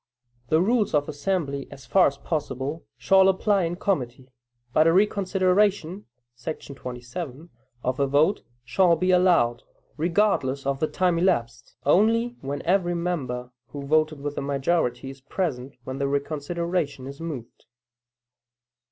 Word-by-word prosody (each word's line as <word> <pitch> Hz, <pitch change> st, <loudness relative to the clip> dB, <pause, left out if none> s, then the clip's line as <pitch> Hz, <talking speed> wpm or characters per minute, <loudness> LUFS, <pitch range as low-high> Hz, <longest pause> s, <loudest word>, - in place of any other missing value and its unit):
The 160 Hz, +1 st, +4 dB
rules 215 Hz, -4 st, +2 dB
of 145 Hz, -1 st, +2 dB
the 155 Hz, -, -5 dB
assembly, 145 Hz, -3 st, -2 dB
as 135 Hz, -, -12 dB
far 190 Hz, -, +5 dB
as 140 Hz, -, -3 dB
possible, 145 Hz, 0 st, -4 dB
shall 190 Hz, 0 st, +5 dB
apply 195 Hz, 0 st, +2 dB
in 170 Hz, +1 st, -2 dB
committee; 130 Hz, -9 st, -2 dB, 0.4 s
but 155 Hz, +4 st, +5 dB
a -, -, +6 dB
reconsideration 195 Hz, -1 st, +2 dB, 0.3 s
[§ 140 Hz, +2 st, -6 dB
27] 125 Hz, +5 st, -7 dB, 0.3 s
of 130 Hz, +1 st, -1 dB
a 140 Hz, -, +2 dB
vote 145 Hz, +8 st, +3 dB, 0.2 s
shall 170 Hz, +7 st, +4 dB
be 185 Hz, +3 st, +1 dB
allowed, 175 Hz, -11 st, +3 dB, 0.4 s
regardless 160 Hz, -6 st, +1 dB
of 140 Hz, 0 st, -1 dB
the 155 Hz, -, +1 dB
time 180 Hz, -1 st, +1 dB
elapsed, 120 Hz, -10 st, 0 dB
only 230 Hz, +9 st, +3 dB
when 140 Hz, +1 st, -4 dB
every 175 Hz, -1 st, +1 dB
member 130 Hz, -8 st, -3 dB, 0.2 s
who 140 Hz, -1 st, -7 dB
voted 155 Hz, 0 st, +1 dB
with 145 Hz, 0 st, -3 dB
the -, -, -4 dB
majority 140 Hz, -2 st, 0 dB
is 135 Hz, 0 st, -14 dB
present 135 Hz, -5 st, -3 dB
when 130 Hz, +2 st, -6 dB
the 140 Hz, -, 0 dB
reconsideration 150 Hz, +1 st, -2 dB
is 140 Hz, +3 st, -9 dB
moved. 145 Hz, -9 st, -7 dB
155 Hz, 145 wpm, -25 LUFS, 135-185 Hz, 0.4 s, a